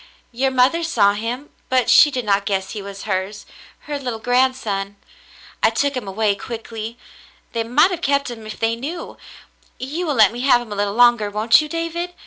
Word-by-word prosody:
Your 260 +3 0
mother 260 +6 +2
saw 220 -12 +2
him, 235 +7 -5 0.2
but 255 -1 +2
she 295 - +7
did 255 -4 -4
not 200 -1 +1
guess 190 -2 -2
he 210 - -5
was 200 0 -9
hers 195 +1 -3 0.2
— - - -25
her 290 -1 -4
little 250 -4 -4
grandson. 235 -5 0 0.7
I - - +5
took 285 -1 -1
him 245 -5 -4
away 205 +1 +1
quickly. 225 +1 -7 0.6
They 230 -1 -1
might 290 +11 +3
have 350 -2 -4
kept 280 -4 0
him 225 -2 -9
if 215 - -8
they 225 0 +1
knew. 300 +9 -7 0.6
You 310 +7 -4
will 295 - 0
let 215 -4 +6
me 240 - -7
have 255 -1 +4
him 240 -3 -10
a - - -3
little 205 0 -1
longer, 240 -3 +4
won't 215 +6 +4
you, 305 - -6
David 335 +2 -4
240 Hz, 200 wpm, -20 LUFS, 210-275 Hz, 0.7 s, she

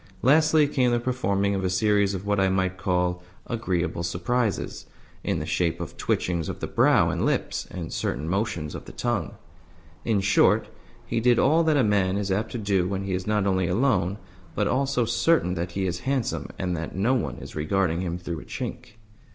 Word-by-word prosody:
Lastly 155 +2 +5
came 130 -3 +2
the 120 0 +2
performing 100 -5 0
of 95 -1 -1
a 95 - +1
series 100 +1 +2
of 95 +1 -6
what 100 -1 +1
I 95 0 +3
might 95 -1 0
call 90 -1 0 0.2
"agreeable 90 -7 -2
surprises," 95 +7 -2 0.4
in - - 0
the - - -3
shape 85 -2 0
of - - -6
twitchings 85 -3 -1
of - - -5
the - - -3
brow - - +3
and - - -2
lips - - -1
and 85 -3 -6
certain 75 +5 -2
motions 95 -5 -2
of - - -7
the - - -10
tongue. 110 - -2 0.7
In 110 -3 +1
short, 95 0 +3 0.4
he - - -1
did 120 +1 +4
all 160 +4 +4
that 155 -2 +3
a 135 - +4
man 100 -3 +2
is 100 -1 -2
apt 105 +4 -1
to - - -2
do 100 -4 +1
when 95 0 -2
he 95 -1 -3
is 90 +1 -3
not 105 -2 +1
only 95 -2 +1
alone, 100 -2 +1 0.4
but - - +1
also 135 -2 +1
certain 115 - +2
that 85 0 -4
he 95 0 -1
is 90 -1 -2
handsome 135 -1 -1
and 90 -1 -1
that 80 +1 -5
no 105 +7 +2
one 125 - -1
is - - -10
regarding 85 +2 0
him 85 -2 -2
through 85 -2 -5
a - - -12
chink. 125 -2 -6
100 Hz, 200 wpm, -25 LUFS, 90-120 Hz, 0.7 s, Lastly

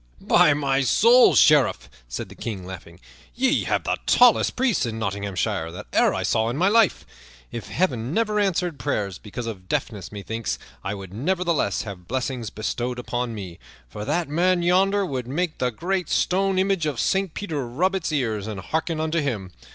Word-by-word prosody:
"By 150 - +4
my 140 -2 +1
soul, 235 - +5
Sheriff," 150 -3 +4 0.2
said - - -5
the - - -11
King, 100 -6 -6
laughing, 90 -2 -10 0.4
"ye 265 +3 +2
have - - 0
the - - -1
tallest 245 -2 +5
priests 250 -4 +1
in 110 -1 -4
Nottinghamshire 100 -6 -2
that 90 - -8
e'er - - +4
I - - -2
saw 110 0 +1
in 120 - -3
all - - -4
my 185 +3 +4
life. 225 -3 +3 0.5
If 115 - -6
Heaven 130 -9 -1
never 215 +2 +1
answered 180 -5 0
prayers 100 -9 -2
because 115 +3 -7
of 95 -5 -7
deafness, 105 -5 -3
methinks 110 +2 -4 0.3
I 100 +2 -3
would 95 -2 -9
nevertheless 170 - 0
have 95 -5 -9
blessings 125 -3 -3
bestowed 120 +4 -3
upon 120 -1 -3
me, 95 -5 -8 0.3
for 105 +12 -7
that 170 +9 -1
man 175 +4 +2
yonder 195 +3 +3
would 130 -7 -4
make 160 +5 -2
the 125 - +1
great 180 - -2
stone 195 +1 +1
image 190 -4 +1
of 145 -5 -3
Saint 195 -4 0
Peter 155 -10 -3
rub 175 +11 0
its 185 -4 -2
ears 110 -8 -1
and 105 -3 -5
hearken 160 - -2
unto 160 +1 0
him. 110 - -3
135 Hz, 180 wpm, -24 LUFS, -, 0.5 s, soul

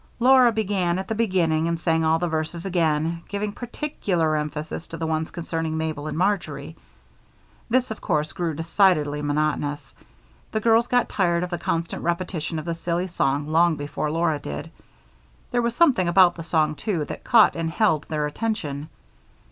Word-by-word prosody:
Laura 250 0 +6
began 195 -5 0
at 190 - -4
the - - -1
beginning 175 -8 +1
and 170 0 -1
sang 165 -1 +1
all 160 0 +3
the 175 +1 -1
verses 160 +2 -3
again, 165 -2 0
giving 205 +1 -3
particular 205 - -2
emphasis 150 +1 -4
to 165 - -7
the 165 - -3
ones 160 0 -1
concerning 165 -2 -3
Mabel 155 -2 -3
and 155 - -4
Marjory. 190 +2 -1 0.9
This, 255 0 +1
of 220 - -6
course, 150 0 0
grew 170 -3 -2
decidedly 165 -3 +2
monotonous; 145 0 -1 0.6
the 220 - 0
girls 230 +2 +3
got 245 0 +2
tired 175 -3 +1
of 180 - -5
the 175 - -2
constant 165 0 -2
repetition 170 -2 -2
of 155 - -5
the 170 - -1
silly 170 +1 -2
song 145 -3 0
long 165 +1 +4
before 145 +1 -3
Laura 160 -1 0
did. 155 +2 -6 0.8
There 245 -1 +2
was 235 0 -1
something 265 - +4
about 175 0 +6
the 170 - -8
song, 160 -2 +1
too, 155 +1 -2
that - - -7
caught 230 -3 +5
and 165 -1 -2
held 165 -5 +1
their 150 -2 -1
attention. 150 -5 -3
170 Hz, 170 wpm, -24 LUFS, 155-195 Hz, 0.9 s, Laura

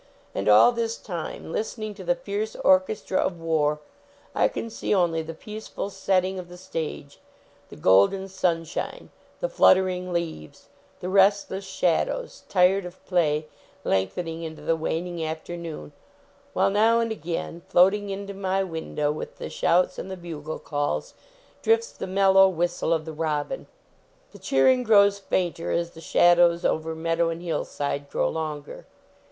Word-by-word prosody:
And 100 +2 -1
all 105 - +8
this 230 -1 -2
time, 170 -3 -6
listening 215 +2 -3
to 195 -2 -10
the 265 - +1
fierce 215 -4 -4
orchestra 190 +1 +2
of 175 -2 -1
war, 150 -2 0 0.5
I - - +3
can 230 - -5
see 210 - -1
only 170 -3 +2
the 160 0 -7
peaceful 210 +1 -6
setting 190 -1 0
of 175 -1 -9
the 180 - -11
stage; 160 -5 -6 0.5
the - - -11
golden 100 - +4
sunshine; 175 -4 -2 0.3
the - - +1
fluttering 185 - +3
leaves; 165 - -5 0.3
the 180 - -3
restless 195 0 +3
shadows, 475 - -1
tired 190 +1 +4
of 180 0 -11
play, 155 -4 +1 0.4
lengthening 160 - -1
into 160 -1 -7
the 165 - +2
waning 165 +1 -3
afternoon, 160 - -6 0.6
while - - +2
now 225 +3 +4
and 230 -1 0
again, 170 -3 -4
floating 195 +3 +4
into 200 0 -5
my 195 0 0
window 160 -4 -2
with 150 - -7
the - - -6
shouts 180 +2 +2
and 190 - -6
the 190 - -5
bugle 155 -3 -6
calls, 145 - -2 0.5
drifts 455 +1 +2
the - - -6
mel 195 +1 +3
low 195 0 +7
whistle 175 -1 -1
of 160 -2 +1
the 160 - -6
robin. 150 -2 -2 0.6
The - - -14
cheering 250 - +3
grows 200 -3 +5
fainter, 180 -3 -1
as 170 0 -1
the 165 - -13
shadows 175 0 +4
over 160 0 0
meadow 165 +1 0
and 165 +1 -5
hillside 145 -4 -3
grow - - 0
longer. 155 -2 -5
175 Hz, 150 wpm, -25 LUFS, 160-195 Hz, 0.6 s, all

